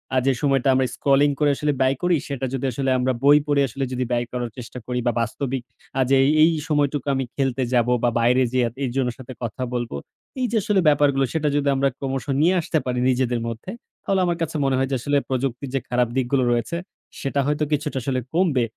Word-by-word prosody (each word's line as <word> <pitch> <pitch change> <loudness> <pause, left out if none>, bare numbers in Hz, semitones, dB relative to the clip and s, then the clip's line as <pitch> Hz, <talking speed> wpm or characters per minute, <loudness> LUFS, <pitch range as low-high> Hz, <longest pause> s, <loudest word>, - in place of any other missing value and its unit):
আ - - +3
যে 135 - +4
সময়টা 135 -2 +2
আমরা 130 0 +2
স্ক্রলিং 140 +1 +3
করে 145 -1 +3 0.3
ব্যয় 130 +1 +3
করি, 175 -1 +3
সেটা 135 -2 -3
যদি 135 0 -2
আসলে 135 +2 -2
আমরা 130 +1 +1
বই 145 +1 +7
পড়ে 145 -1 +3
আসলে 135 +4 -4
যদি 125 0 -1
ব্যয় 120 0 +1
করার 125 -1 -3
চেষ্টা 125 +1 -8
করি, 125 0 -1
বা - - +4
বাস্তবিক 130 +3 -3 0.4
আজ 130 -1 +1 0.3
এই 165 - +6 0.2
সময়টুকু 145 -2 0
আমি 135 - -1
খেলতে 135 -2 0
যাব 120 -1 +3 0.2
বা 120 - +4
বাইরে 125 +2 +3 0.4
এইজনের 125 -1 -1
সাথে 130 0 -9
কথা 120 +2 -5
বলবো 120 -8 -3 0.4
এই 255 - +1
যে 235 - +1
আসলে 205 -1 +2
ব্যাপারগুলো, 140 -2 +3
সেটা 155 -2 0
যদি 145 -1 +1
আমরা 135 +1 +2
ক্রমশ 135 -1 -3 0.2
নিয়ে 175 +4 +4
আসতে 160 - -1
পারি 125 -1 -1
নিজেদের 125 -1 +1
মধ্যে, 115 +11 -6 0.3
তাহলে 195 -1 +1
আমার 175 -1 0
কাছে 165 -1 -2
মনে 135 - +2
হয় 135 0 +1
যে - - +1
আসলে 145 +3 +1
প্রযুক্তির 130 0 -2
যে - - +2
খারাপ 125 0 +2
দিকগুলো 130 0 +1
রয়েছে, 120 +8 -1 0.4
সেটা 140 0 -1
হয়তো 150 +1 0
কিছুটা 150 -1 -1
আসলে 130 0 -1
কমবে। 160 -8 +2
135 Hz, 205 wpm, -23 LUFS, 125-145 Hz, 0.4 s, বই